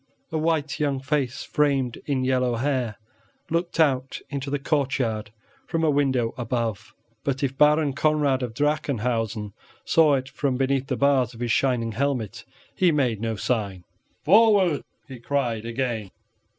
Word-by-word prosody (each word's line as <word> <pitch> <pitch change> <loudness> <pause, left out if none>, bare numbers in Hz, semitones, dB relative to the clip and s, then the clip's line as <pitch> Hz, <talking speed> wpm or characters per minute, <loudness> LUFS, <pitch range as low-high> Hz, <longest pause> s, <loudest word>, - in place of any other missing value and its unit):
A 160 - -1
white 155 -2 0
young 140 -3 0
face 135 -2 -1
framed 135 -5 0
in 135 -3 0
yellow 125 -2 +1
hair 125 -4 -1 0.5
looked 170 0 -1
out 135 -4 +2
into 140 -1 -3
the 145 - 0
courtyard 130 -7 -1 0.4
from 165 0 -1
a 155 - +4
window 130 -5 +1
above; 115 -3 -3 0.3
but 140 0 -2
if 135 -1 -1
Baron 150 0 +4
Conrad 145 -2 +2
of 120 -3 -4
Drachenhausen 120 -7 -1 0.3
saw 155 -3 +4
it 130 -1 -3
from 135 -1 -1
beneath 135 0 0
the 130 -4 -2
bars 135 -4 +2
of - - -12
his 120 -1 -1
shining 125 -3 +1
helmet, 120 -2 -2 0.3
he 180 -2 +3
made 125 -8 0
no 115 -1 -1
sign. 100 -4 -2 0.4
"Forward," 200 -4 +5 0.3
he 130 -3 -9
cried 120 -4 -1
again. 115 -3 -2
135 Hz, 150 wpm, -24 LUFS, 120-145 Hz, 0.5 s, Forward